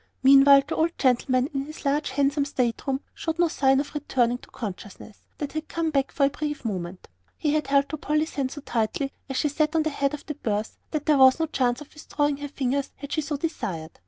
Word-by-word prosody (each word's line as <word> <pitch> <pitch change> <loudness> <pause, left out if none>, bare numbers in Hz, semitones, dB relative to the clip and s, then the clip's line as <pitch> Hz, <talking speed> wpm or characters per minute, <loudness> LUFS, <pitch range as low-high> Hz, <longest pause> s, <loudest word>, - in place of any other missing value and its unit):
Meantime 275 +1 +8
the 320 - -2
old 335 +1 0
gentleman, 255 0 +2
in 275 0 -2
his 305 -1 -10
large 285 +1 +1
handsome 280 +2 +1
state 255 -3 -2
room, 270 0 0
showed 325 0 -3
no 345 0 +4
sign 270 -3 +3
of 285 - -4
returning 245 -5 0
to - - -16
the - - -25
consciousness 205 -1 -8 0.2
that 290 -2 -4
had 310 0 -4
come 330 -1 -1
back 275 -2 0
for 280 - +2
a - - +3
brief 295 -2 -4
moment. 180 -4 -4 0.4
And 300 -2 +2
he 310 - +2
held 280 +1 +2
to 310 - -4
Polly's 305 +2 -1
hand 270 -2 -1
so 290 - -8
tightly, 245 +3 -2 0.2
as 270 - -2
she - - +2
sat 305 +2 0
at 320 - +3
the 315 - -1
head 280 0 0
of 295 - -13
the 300 - -4
berth, 215 -4 -3
that 305 -2 -3
there 300 -3 +4
was 260 +3 +7
no 325 - +2
chance 255 -4 0
of 295 - -12
withdrawing 290 -1 -1
her 290 0 -5
fingers 275 0 -1
had 285 0 -9
she 310 - 0
so 295 0 -3
desired. 180 - -4
280 Hz, 240 wpm, -25 LUFS, 260-300 Hz, 0.4 s, Meantime